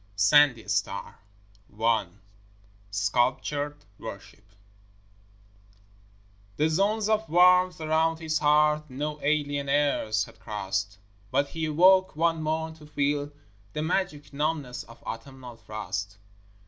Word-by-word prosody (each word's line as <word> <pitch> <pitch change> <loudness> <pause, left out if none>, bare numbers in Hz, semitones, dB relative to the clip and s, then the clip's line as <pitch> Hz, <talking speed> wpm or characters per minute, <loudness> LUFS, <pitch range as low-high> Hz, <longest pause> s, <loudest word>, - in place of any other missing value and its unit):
SANDY 120 +3 +4
STAR - - -2 0.6
I 110 -3 +2 0.8
Sculptured 125 +8 -1
Worship 105 -1 -10 2.1
The 155 +2 +2
zones 200 +6 +1
of 220 0 0
warmth 180 +1 +5
around 160 +1 +1
his 160 -1 -1
heart, 150 0 +3
No 150 +3 -4
alien 145 -1 0
airs 140 -7 +1
had - - -17
crossed; 95 -1 -3 0.3
But 140 +3 +1
he 160 -1 -3
awoke 185 +4 +4
one 165 0 +1
morn 160 +1 -2
to 150 -1 -14
feel 145 0 -1 0.4
The 150 - -2
magic 160 -4 -2
numbness 150 -3 -2
of 115 - -16
autumnal 125 0 -8
frost. 100 -2 -5
145 Hz, 110 wpm, -27 LUFS, 115-160 Hz, 2.1 s, warmth